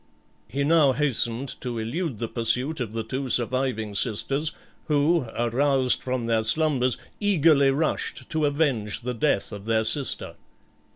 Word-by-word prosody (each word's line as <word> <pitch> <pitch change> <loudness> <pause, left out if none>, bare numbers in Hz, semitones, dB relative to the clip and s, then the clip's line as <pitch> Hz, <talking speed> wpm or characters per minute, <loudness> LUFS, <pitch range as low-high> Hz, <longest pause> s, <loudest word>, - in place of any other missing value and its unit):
He 140 +2 -2
now 150 -2 +4
hastened 130 -3 0
to 120 -2 -3
elude 125 - -3
the 115 - -3
pursuit 125 +7 0
of 115 -4 -4
the 115 0 -3
two 130 +4 -4
surviving 120 -3 0
sisters, 135 +9 0 0.3
who, 150 -1 +2
aroused 130 +2 +1
from 130 -2 -2
their 115 -1 +1
slumbers, 130 +1 +2 0.2
eagerly 160 -9 +4
rushed 150 +4 -1
to 155 -2 +1
avenge 140 -9 0
the 125 +1 -3
death 120 -4 0
of 100 -1 -8
their 110 0 +1
sister. 130 +5 -1
130 Hz, 140 wpm, -25 LUFS, 115-145 Hz, 0.3 s, now